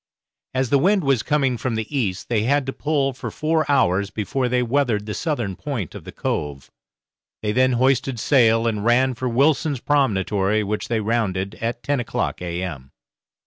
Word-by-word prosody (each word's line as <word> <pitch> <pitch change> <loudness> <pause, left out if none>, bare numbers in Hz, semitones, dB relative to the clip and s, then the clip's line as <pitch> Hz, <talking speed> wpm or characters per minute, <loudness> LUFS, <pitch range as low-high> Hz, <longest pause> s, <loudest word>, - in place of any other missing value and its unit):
As 130 -1 0
the 140 - +5
wind 195 +5 +3
was 135 -5 +2
coming 135 -4 0
from 125 -1 -2
the 110 0 -2
east, 100 -9 -1
they 115 -3 +1
had 140 +4 +1
to 135 - -4
pull 140 -3 0
for 125 - -6
four 155 -1 0
hours 100 -6 +2
before 125 +5 -2
they 125 0 +1
weathered 120 -4 0
the 105 - -4
southern 120 - -2
point 120 - -4
of - - -10
the - - -8
cove; 70 -2 -4 0.7
they 105 - 0
then 130 +3 +3
hoisted 130 0 +1
sail 115 -3 +4
and 105 -3 -1
ran 125 +3 +3
for 125 +1 -3
Wilson's 140 +2 +2
Promentory, 105 -7 +1
which 105 +1 -3
they 115 -2 0
rounded 100 -3 -1
at 115 +1 -3
ten 145 -1 0
o'clock 120 - -2
a.m. 85 -6 -5
120 Hz, 180 wpm, -22 LUFS, 105-135 Hz, 0.7 s, the